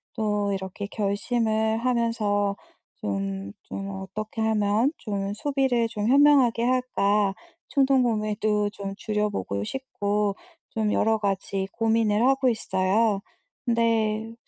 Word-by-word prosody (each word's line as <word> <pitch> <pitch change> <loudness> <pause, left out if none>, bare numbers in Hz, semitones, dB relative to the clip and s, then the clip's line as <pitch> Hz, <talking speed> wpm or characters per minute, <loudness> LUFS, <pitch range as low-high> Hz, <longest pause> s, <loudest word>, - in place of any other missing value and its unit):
또 210 -3 0
이렇게 190 +1 -5
결심을 220 +2 0
하면서 225 -5 +1 0.4
좀 100 0 -3
좀 195 0 -6
어떻게 200 +3 -5
하면 220 +3 +2
좀 200 -3 -3
소비를 260 -1 +1
좀 215 -2 -3
현명하게 275 -4 +5
할까 210 -5 +2 0.4
충동구매도 215 -6 +2
좀 200 -1 -6
줄여 210 -1 -1
보고 100 - -3
싶고 205 - -1 0.3
좀 215 -2 -1
여러 220 +1 +2
가지 195 -1 -1
고민을 225 -2 +2
하고 270 -1 +3
있어요. 200 -1 +1 0.4
근데 225 -2 +1
215 Hz, 230 characters per minute, -25 LUFS, 200-230 Hz, 0.4 s, 현명하게